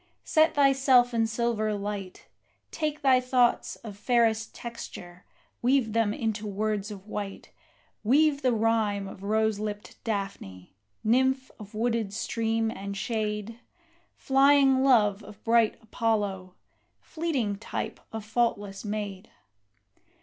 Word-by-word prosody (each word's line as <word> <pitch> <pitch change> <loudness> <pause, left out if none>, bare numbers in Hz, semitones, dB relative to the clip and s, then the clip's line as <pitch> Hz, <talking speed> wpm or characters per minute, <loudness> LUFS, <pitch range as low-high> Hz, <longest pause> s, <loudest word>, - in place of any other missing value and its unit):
Set 315 +1 +3
thyself 270 -3 +4
in 225 -1 +2
silver 225 -2 0
light, 200 -2 -5 0.5
Take 305 -1 -3
thy 260 -2 +5
thoughts 250 -1 +2
of 215 -3 -10
fairest 225 0 +1
texture, 180 -6 -9 0.4
weave 245 -3 +2
them 225 -2 +2
into 215 -1 -2
words 210 0 -2
of 200 -2 -9
white 205 -2 -6 0.5
Weave 285 +5 +3
the 255 - +2
rhyme 220 -3 +1
of 190 - -10
rose 215 +1 +1
lipped 210 -1 -6
Daphne, 195 - -5 0.3
nymph 260 +3 +2
of 210 0 -11
wooded 225 -2 -1
stream 225 0 -1
and 200 -2 -6
shade, 215 +1 -3 0.6
Flying 270 -1 +4
love 215 -6 +4
of 210 0 -13
bright 230 -1 +3
Apollo, 205 -5 -1 0.4
fleeting 275 - -2
type 225 - -5
of 220 -1 -6
faultless 215 -3 -1
maid! 205 -3 -5
220 Hz, 120 wpm, -27 LUFS, 205-245 Hz, 0.6 s, thy